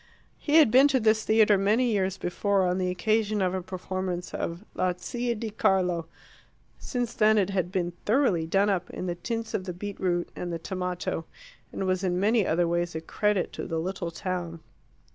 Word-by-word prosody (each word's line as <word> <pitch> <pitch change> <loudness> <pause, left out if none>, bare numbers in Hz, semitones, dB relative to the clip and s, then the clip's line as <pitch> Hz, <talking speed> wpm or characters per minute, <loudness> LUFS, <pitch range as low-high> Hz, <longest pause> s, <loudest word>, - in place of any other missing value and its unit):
He 295 - 0
had 310 -9 +7
been 265 +4 +7
to 270 -2 +2
this 220 -1 +3
theatre 215 -2 +4
many 225 +5 +2
years 190 -3 0
before, 195 +2 0
on 180 +1 0
the 185 -1 0
occasion 215 +3 +1
of 185 -1 +1
a 190 - -2
performance 185 -1 -4
of 170 +5 -4
"La 185 -1 0
Zia 240 +4 -2
di 220 0 -5
Carlo." 180 -5 +1 0.7
Since 245 -3 -3
then 215 -3 +4
it 200 -1 +2
had 185 -2 -1
been 175 -2 -1 0.2
thoroughly 210 - +2
done 195 +4 +2
up, 185 -4 -2
in - - -5
the 175 - -1
tints 225 +6 -4
of 185 - -2
the 180 - -4
beet 200 +3 -7
root 175 -2 0
and 175 - -4
the 170 - -2
tomato, 180 -1 -3 0.5
and 195 - -3
was 185 0 0
in 180 -1 0
many 215 0 +2
other 170 +1 +2
ways 175 0 -1
a 160 - -3
credit 210 +3 0
to - - -5
the 165 - -2
little 175 +1 -3
town. 170 -1 -4
190 Hz, 200 wpm, -27 LUFS, 175-215 Hz, 0.7 s, had